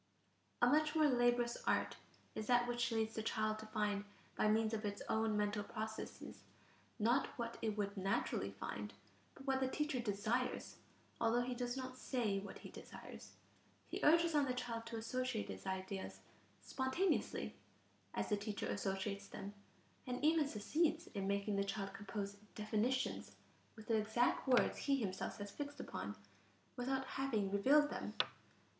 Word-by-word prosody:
A - - +11
much 305 +1 +4
more 310 -1 +6
laborious 240 -3 +3
art - - +2 0.4
is 215 - -4
that 245 -1 +5
which 240 -1 +1
leads 220 -1 +1
the 220 - -2
child 215 0 0
to 220 - -8
find 210 -2 0 0.3
by - - +3
means 220 +1 +3
of 220 0 -1
its 205 -1 -2
own 220 -1 +2
mental 205 0 +1
processes, 220 +1 -5 0.6
not 240 +5 +3
what 235 -1 -3
it 215 -2 0
would 200 0 -1
naturally 195 0 0
find, - - -5 0.4
but 270 - -11
what 265 -1 +2
the 265 - +2
teacher 300 0 0
desires, 230 +3 0 0.4
although 235 +1 +3
he 250 +1 -2
does 245 +1 -2
not 255 -1 -5
say 220 -7 0
what 200 - -7
he - - -10
desires; - - -10 0.6
he - - -2
urges 335 +2 +6
on 295 -2 +4
the 255 -2 -1
child 230 -2 -3
to 230 0 -4
associate 250 0 -1
his - - -6
ideas 190 0 -3 0.4
"spontaneously" 265 +9 0 0.6
as - - -1
the 210 - +3
teacher 205 0 -3
associates 200 0 -1
them 200 +1 -6 0.5
and 250 +3 -1
even 315 -2 +5
succeeds 310 +8 +1
in 195 -1 -1
making 200 +1 +1
the 200 - +3
child 195 0 -3
compose 200 0 -4 0.2
definitions 220 +5 0 0.4
with 220 -1 -11
the 225 - +4
exact 220 +5 +2
words 250 -2 +4
he 280 - +3
himself 200 -8 -2
has 205 -1 -5
fixed 290 +3 -5
upon, - - -4 0.6
without 265 +1 0
having 230 -8 0
revealed 285 +9 +5
them. - - -4
225 Hz, 160 wpm, -39 LUFS, 205-255 Hz, 0.6 s, A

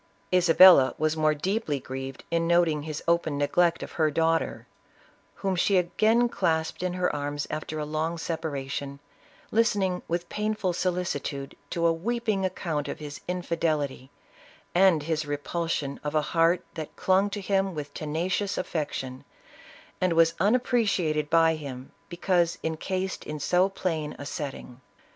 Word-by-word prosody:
Isabella 180 -6 +7
was 155 0 +1
more 155 -1 +2
deeply 180 -2 -1
grieved 135 +1 -7
in 165 0 +1
noting 170 -3 +3
his 155 0 -6
open 170 -3 +1
neglect 170 +4 +2
of - - -8
her 155 -2 +1
daughter, 165 +2 0 0.7
whom 195 -2 -1
she 190 +2 +3
again 215 +7 +3
clasped 160 -8 -1
in 180 -1 -1
her 180 -3 0
arms 145 0 -3
after 155 0 -4
a 150 - -2
long 155 +3 -2
separation, 140 -4 -4 0.5
listening 200 -5 +1
with 170 +1 -2
painful 210 -3 -1
solicitude 170 -6 -2
to 170 -1 -1
a 165 - +4
weeping 215 +2 -1
account 165 -5 -2
of - - -4
his 145 -1 -8
infidelity, 160 -7 -2 0.6
and 180 -4 +4
his 155 -1 -2
repulsion 145 -1 -2
of 150 +1 -3
a 155 - +4
heart 165 +1 +3
that 155 -2 -7
clung 190 +2 +2
to 205 - -4
him 195 -1 0
with 145 -1 -6
tena 160 +4 -3
cious 200 +1 -1
affection, 135 -6 -3 0.8
and 185 -2 +2
was 165 0 +4
unappreciated 200 - +1
by 165 0 +5
him 135 -4 -7 0.2
because 175 -1 +1
encased 185 +4 -3
in 150 0 -6
so 180 +6 +2
plain 160 -6 -3
a 145 - -8
setting. 135 -4 -6
165 Hz, 145 wpm, -27 LUFS, 150-185 Hz, 0.8 s, Isabella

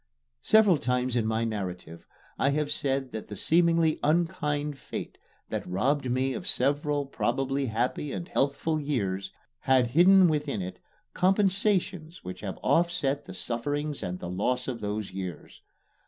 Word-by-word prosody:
Several 210 -7 +5
times 125 0 0
in 115 -2 +1
my 110 +1 0
narrative, 90 -7 -5 0.3
I 135 - +3
have 150 +1 0
said 135 -2 0
that 110 - -6
the 105 - -7
seemingly 165 - +3
unkind 150 -3 0
fate - - -7 0.3
that - - -3
robbed 130 +9 0
me 130 +2 0
of - - -6
several 145 +2 +1
probably 135 +1 -1
happy 125 +5 -1
and 170 - -5
healthful 145 +3 0
years 100 -10 -2 0.3
had 130 -2 +3
hidden 180 +6 +6
within 150 -7 -1
it 90 - -7 0.3
compensations 190 -3 +1
which 90 0 -7
have 100 -3 -5
offset 145 -5 +1
the - - -9
sufferings 145 +5 -2
and 90 0 -3
the 90 - -7
loss 125 +7 -1
of 125 -3 -4
those 105 0 -3
years. 95 -2 -7
135 Hz, 145 wpm, -28 LUFS, 115-155 Hz, 0.3 s, hidden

